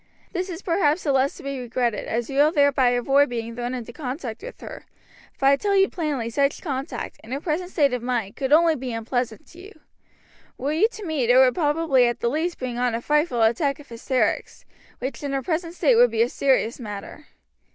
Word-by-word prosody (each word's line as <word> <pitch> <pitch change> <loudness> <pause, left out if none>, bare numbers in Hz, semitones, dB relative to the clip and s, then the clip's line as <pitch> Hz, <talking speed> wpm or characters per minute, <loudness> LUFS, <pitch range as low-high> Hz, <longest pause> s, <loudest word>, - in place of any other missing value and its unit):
This 370 +1 -2
is 350 +1 -7
perhaps 335 -3 +1
the 290 - +1
less 270 +3 +1
to - - -12
be 275 -1 -4
regretted, 240 -2 -2
as 230 +1 -2
you 275 - -5
will 300 +2 +5
thereby 285 -4 +3
avoid 270 +3 +3
being 230 -1 -4
thrown 245 +1 -3
into 240 -1 -7
contact 255 -3 -5
with - - -9
her; - - -9 0.5
for 270 - -4
I 275 +1 +6
tell 400 +7 0
you 390 0 +4
plainly 295 -9 -2
such 280 +4 +1
contact, 275 -2 -5
in 220 - -12
her 270 - -2
present 335 +3 -2
state 285 -7 +2
of 250 - -2
mind, 235 -5 -2
could 270 0 -3
only 325 +1 +5
be 255 -3 -5
unpleasant 225 0 -3
to 340 - -15
you. 395 -2 -13 0.8
Were 285 +3 -2
you 360 +8 +4
to 420 - -8
meet, 295 -8 -1
it 245 - +6
would 260 -1 +6
probably 295 -5 +2
at 240 - -2
the 235 - 0
least 330 +4 -1
bring 245 -2 -4
on 245 -2 +1
a - - -1
frightful 295 -4 +1
attack 275 +6 +1
of 290 - -15
hysterics, 245 +2 -2 0.3
which 255 -1 -5
in 285 -1 -3
her 270 -1 -1
present 335 +2 -2
state 285 -9 +3
might 245 - +8
be 225 0 +2
a 240 - -1
serious 260 -4 +1
matter. 210 +5 -8
270 Hz, 220 wpm, -23 LUFS, 245-315 Hz, 0.8 s, might